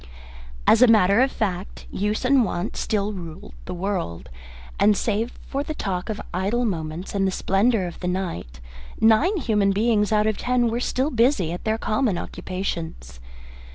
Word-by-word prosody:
As 225 - +5
a 250 - +8
matter 215 -1 +5
of 265 0 +3
fact, 190 -3 -3
use 210 +5 -1
and 265 -1 +5
wont 180 -2 -3
still 210 -1 -1
ruled 175 0 -9
the 180 - -5
world, 175 - -3 0.5
and 210 -1 +4
save 225 +2 -1
for 275 - -2
the 310 +1 -5
talk 190 -4 -3
of 215 -1 -3
idle 200 +7 0
moments 165 -3 -4
and 195 -1 +1
the - - 0
splendour 195 +2 +1
of 175 - -7
the 180 - -3
night, 170 - -4 0.4
nine 225 - +4
human 210 - +2
beings 210 +1 +2
out 210 0 +3
of 215 -1 0
ten 245 -1 +1
were 235 - -1
still 260 +4 0
busy 230 - +2
at 175 - -6
their 220 0 +1
common 215 -3 0
occupations. 165 - -5
205 Hz, 170 wpm, -23 LUFS, 180-230 Hz, 0.5 s, a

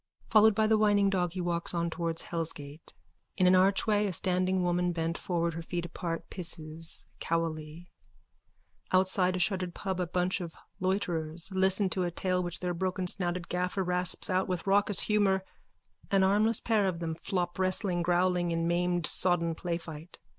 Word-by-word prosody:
Followed 220 -1 +6
by 220 0 +2
the 215 0 +3
whining 205 -2 +3
dog 180 -3 -1
he 185 - -3
walks 175 0 -1
on 170 0 0
towards 165 -1 -1
hellsgates. 155 -2 -5 0.4
In 185 - +3
an 180 +1 +6
archway 205 +3 +3
a 190 - -3
standing 185 +1 +2
woman, 175 0 0
bent 165 0 -2
forward, 170 -2 -2
her 165 - -5
feet 175 +1 -4
apart, 170 0 -5
pisses 165 -2 -3
cowily. 165 0 -3 1.0
Outside 185 0 +3
a - - -2
shuttered 180 -1 0
pub 190 -2 -3
a 180 - -1
bunch 180 +2 -1
of 170 -2 -7 0.2
loiterers 175 -3 -1
listen 190 +1 +2
to 185 - -1
a 175 - 0
tale 180 +1 -1
which 175 -1 -4
their 180 -1 -1
brokensnouted 180 -1 -2
gaffer 180 +2 -1
rasps 180 0 0
out 185 0 0
with 180 -3 -3
raucous 200 0 +4
humour. 200 -3 +2 0.7
An 195 -2 +3
armless 210 +3 +3
pair 215 -4 +1
of 180 -3 -2
them 165 -1 -3
flop 175 +2 -3
wrestling, 185 -1 +1
growling, 175 0 +1
in 165 0 -1
maimed 175 0 0
sodden 170 -1 +3
playfight.) 170 -1 -6
180 Hz, 165 wpm, -29 LUFS, 170-190 Hz, 1.0 s, Followed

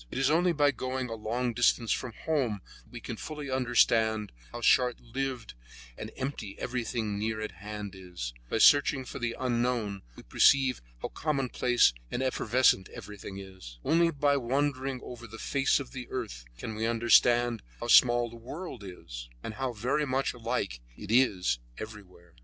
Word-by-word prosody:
It - - -6
is 135 +2 +3
only 175 +3 +3
by 145 -3 +3
going 130 0 -3
a - - -4
long 120 +3 -2
distance 120 -1 +2
from 125 -3 -2
home 130 -11 0 0.2
that - - -24
we - - -7
can - - -6
fully 150 -3 -6
understand 115 -4 +2 0.2
how 120 - -7
short 125 0 +4
lived 125 -1 -4 0.4
and 110 - -7
empty 130 -7 -5
everything 115 -4 -2
near 110 +1 -1
at 110 0 -4
hand 105 +1 -7
is; 90 -10 -7 0.2
by - - 0
searching 140 +2 +5
for - - -7
the 120 -1 -2
unknown, 120 -5 0
we - - -12
perceive 130 - +4 0.2
how - - -2
commonplace 130 - +2 0.2
and 130 - -2
evanescent 125 -5 +2
everything 105 -3 -9
is; 95 -12 -10
only 170 +1 +4
by 145 -2 +2
wandering 135 0 -1
over 120 -1 -9
the 110 +1 -10
face 135 +4 +1
of 135 -3 -7
the 125 -2 -7
earth 105 - -5
can 110 - -5
we 110 +1 -1
understand 120 0 +4 0.2
how - - -5
small 120 0 +6
the 115 - -11
world 130 - -8
is, - - -9
and 110 - -5
how 130 +3 -2
very 125 +7 -1
much 130 +1 0
alike 115 - -3 0.2
it 105 0 -7
is 100 - +3 0.2
everywhere. 95 -6 -10
120 Hz, 170 wpm, -29 LUFS, 105-130 Hz, 0.4 s, small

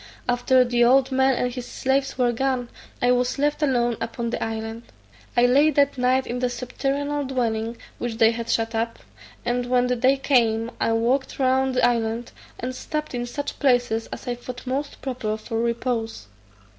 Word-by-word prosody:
After 250 +1 +3
the 240 0 +2
old 265 +2 +4
man 265 0 +3
and 245 0 -1
his 250 -1 -6
slaves 270 0 0
were 245 -2 +3
gone, 250 0 -1 0.3
I 245 - +5
was 250 +1 +1
left 295 +2 0
alone 240 -5 +1
upon 235 0 -3
the - - -2
island. 225 0 -4 0.6
I 240 - +6
lay 280 +5 +5
that 285 -1 +2
night 255 +1 +2
in 245 +1 -3
the 250 0 +1
subterranean 275 +4 -2
dwelling, 230 -3 -1 0.2
which 240 -2 -3
they 225 -1 +5
had 235 0 -5
shut 225 0 0
up, 230 +1 -1 0.5
and 245 0 0
when 250 0 +3
the 250 0 +1
day 260 +3 +3
came, 235 -4 +2
I - - +2
walked 245 +4 0
round 265 0 +2
the 250 - +4
island, 230 -1 0 0.3
and 255 +2 -3
stopped 305 +1 -4
in 245 0 -3
such 285 +4 -5
places 245 -4 +2
as - - -8
I 245 - 0
thought 245 +1 -8
most 275 +3 -3
proper 235 -5 -2
for 225 +1 -4
repose. 235 - -2
245 Hz, 180 wpm, -24 LUFS, 235-265 Hz, 0.6 s, I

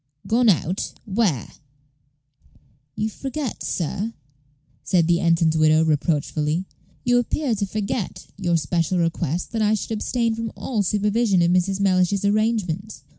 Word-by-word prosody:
"Gone 235 +1 +3
out! 180 0 0
where?" 195 - 0 1.4
"You 215 - -1
forget, 270 +3 -5
sir," 195 +7 -2 0.7
said 165 +3 +2
the 170 0 +3
ensign's 165 -2 +2
widow, 155 0 +4
reproachfully 155 +2 0 0.4
"you 245 0 +3
appear 250 +2 -1
to 200 -2 -1
forget 210 +1 -3
your 175 -3 +1
special 170 +2 0
request 170 -1 -1
that 225 - -1
I 215 0 +3
should 215 - -5
abstain 230 +1 0
from 225 -1 -4
all 225 -5 -2
supervision 205 -1 +2
of 170 - +3
Mrs. 185 +2 +1
Mellish's 190 0 +2
arrangements. 210 -2 0
195 Hz, 130 wpm, -23 LUFS, 170-220 Hz, 1.4 s, widow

